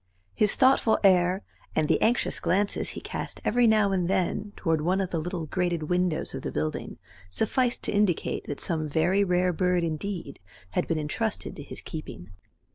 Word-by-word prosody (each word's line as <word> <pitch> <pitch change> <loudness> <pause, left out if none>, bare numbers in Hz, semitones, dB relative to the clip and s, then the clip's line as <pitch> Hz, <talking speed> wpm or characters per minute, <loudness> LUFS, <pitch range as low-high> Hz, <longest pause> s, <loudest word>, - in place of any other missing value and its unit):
His 205 - +5
thoughtful 260 -4 +4
air, 185 0 +4 0.3
and 155 -1 +2
the - - +2
anxious 240 +2 +2
glances 200 +3 0
he - - -5
cast - - -5
every 240 +1 +3
now 215 -2 +4
and 180 -2 0
then 195 +2 -1
toward 165 -4 0
one 180 +5 +1
of 190 -2 -2
the 165 - -1
little 170 0 -4
grated 175 -1 -2
windows 180 -2 0
of - - -5
the - - -4
building 75 +1 -3 0.3
sufficed 240 - 0
to - - -1
indicate 205 -5 0
that 145 - -5
some 155 -3 -2
very 175 +7 +2
rare 180 -1 +1
bird 180 0 +1
indeed 165 -1 -4 0.3
had - - -1
been 165 - 0
entrusted 180 +9 -3
to - - -8
his 145 - -6
keeping. 100 - -8
180 Hz, 180 wpm, -27 LUFS, 160-200 Hz, 0.3 s, His